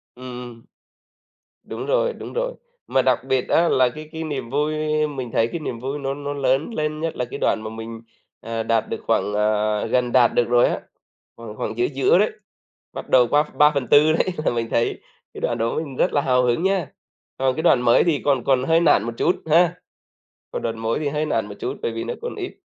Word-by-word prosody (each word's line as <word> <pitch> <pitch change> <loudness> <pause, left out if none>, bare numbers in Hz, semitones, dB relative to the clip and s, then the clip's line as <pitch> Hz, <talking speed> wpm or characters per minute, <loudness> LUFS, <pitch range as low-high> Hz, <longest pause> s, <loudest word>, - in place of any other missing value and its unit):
Ừm, 130 +1 -11 0.3
ừm. 115 -1 -16 1.0
Đúng - - -6
rồi, - - +1
đúng - - -9
rồi. - - -2 0.3
Mà 135 - +2
đặc 130 -1 +1
biệt 130 -1 0
á 170 +1 +3
là 130 -1 +3
cái 155 +4 -10
cái 160 0 -5
niềm 140 -6 -4
vui 150 +3 0 0.3
mình 130 -5 -6
thấy 115 - +2
cái 170 - -5
niềm 120 -6 -5
vui 135 +4 -4
nó 135 0 -2
nó 145 0 -5
lớn 140 - 0
lên, 155 -2 -2
nhất 165 0 -3
là 125 - -2
cái 120 - -7
đoạn 110 - +1
mà 110 - -5
mình, 115 0 -8 0.4
ờ, 115 0 -3
đạt 115 -1 0
được - - -2
khoảng, 105 - +1
ờ, 105 +1 +1
gần 125 +1 +1
đạt 125 -2 +4
được 120 - +3
rồi 120 0 +5
á, - - -2 0.6
khoảng 115 -2 -9
khoảng - - -4
giữa 365 - +2
giữa 395 +4 +2
đấy, - - +2 0.6
bắt - - -7
đầu 125 -2 +5
qua 145 +4 +3
3/4 150 0 +4
đấy 160 - +1 0.2
là - - +3
mình 115 -1 -2
thấy 115 - 0 0.3
cái - - -9
đoạn 120 - -1
đó 115 0 -1
mình 150 -4 -4
rất - - +1
là 145 - +3
hào 125 -2 +2
hứng 125 +7 +1
nhá. 190 -6 +1 0.5
Còn 130 -1 +1
cái 160 - -2
đoạn 135 -7 +4
mới 120 -1 +4
thì 165 -5 +1
còn 135 -4 +2
còn 130 -2 +2
hơi 165 +4 +3
nản 145 -11 +4
một 115 +1 -4
chút 175 - +2
ha, 170 +2 +4 0.8
còn - - -4
đoạn 115 -1 -3
mới 115 0 -1
thì 150 - -1
hơi 150 +2 -1
nản 115 -8 0
một 105 - -8
chút - - -3
bởi 115 - -1
vì 115 0 -4
nó - - -4
còn 480 - -4
ít. 370 -2 -5
130 Hz, 230 wpm, -22 LUFS, 115-155 Hz, 1.0 s, rồi